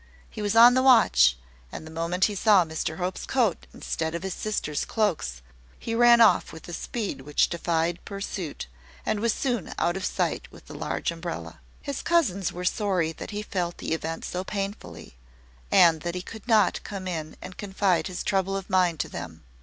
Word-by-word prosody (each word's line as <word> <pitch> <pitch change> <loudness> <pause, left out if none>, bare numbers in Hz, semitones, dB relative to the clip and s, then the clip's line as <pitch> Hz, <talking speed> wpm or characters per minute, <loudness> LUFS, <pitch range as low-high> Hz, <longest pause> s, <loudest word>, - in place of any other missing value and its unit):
He - - -7
was 205 +1 0
on 235 +2 +9
the 260 - +3
watch; 60 - +5 0.3
and - - -7
the 160 - -10
moment 170 +3 0
he 210 - -1
saw 200 -2 +4
Mr 160 0 -4
Hope's 185 0 -3
coat 235 -9 0
instead 160 0 -3
of 170 - -4
his 190 -1 -3
sisters' 165 -9 -2
cloaks, 160 - -1 0.3
he 230 - -5
ran 235 0 +6
off 225 - +5
with 160 - -11
a 175 - -7
speed 210 - -4
which 145 +2 +1
defied 170 0 -1
pursuit, 195 -5 -5 0.4
and 210 - 0
was 230 +2 +2
soon 240 - -2
out 175 - +1
of 190 - -4
sight - - -2
with - - -15
the - - -11
large - - -2
umbrella. - - -6 0.2
His 280 -3 -4
cousins 215 - +1
were 180 +1 -6
sorry 185 -5 +1
that - - -8
he 210 0 -4
felt 175 -4 -3
the - - -3
event 165 0 -4
so 180 +1 -3
painfully, 195 - -6 0.5
and 165 -3 +6
that 175 +2 -4
he 180 - -4
could 220 +3 -11
not 215 -5 +3
come 195 -2 -6
in 155 -3 -5
and 185 - -9
confide 190 -4 0
his 185 -1 -5
trouble 195 0 0
of 195 +1 -8
mind 180 -4 +2
to - - -4
them. 80 -1 -8
185 Hz, 195 wpm, -26 LUFS, 165-210 Hz, 0.5 s, on